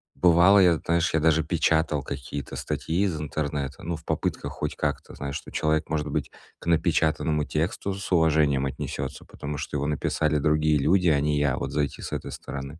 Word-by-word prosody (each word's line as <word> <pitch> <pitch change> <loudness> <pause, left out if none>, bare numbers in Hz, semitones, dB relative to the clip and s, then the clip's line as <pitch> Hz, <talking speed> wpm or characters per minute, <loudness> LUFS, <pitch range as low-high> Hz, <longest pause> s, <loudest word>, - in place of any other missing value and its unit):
бывало, 90 +3 +6
я, 90 -3 +5
знаешь, 85 +1 +1
я 80 - +3
даже 80 0 +3
печатал 80 -2 +1
какие-то 70 +1 -6
статьи 85 +4 -2
из 85 -6 -1
интернета, 75 -2 -3
ну, 85 0 -3
в 80 - -17
попытках - - -2
хоть - - -4
как-то, - - -3
знаешь, 70 0 -5
что - - -7
человек, 80 0 0
может 75 -2 -1
быть, - - -2 0.3
к - - -14
напечатанному 80 -2 +2
тексту 85 +6 -2
с 100 0 -6
уважением 75 -5 +3
отнесётся, 65 0 -5
потому 70 +1 -6
что 70 - -5
его 70 0 -1
написали 75 +1 0
другие 75 +1 +2
люди, 85 +5 +3
а 75 - +3
не 75 +1 +1
я, 70 -3 +1
вот - - -3
зайти 70 -3 -2
с - - -6
этой - - -4
стороны. 70 +3 -7
75 Hz, 190 wpm, -26 LUFS, 70-80 Hz, 0.3 s, бывало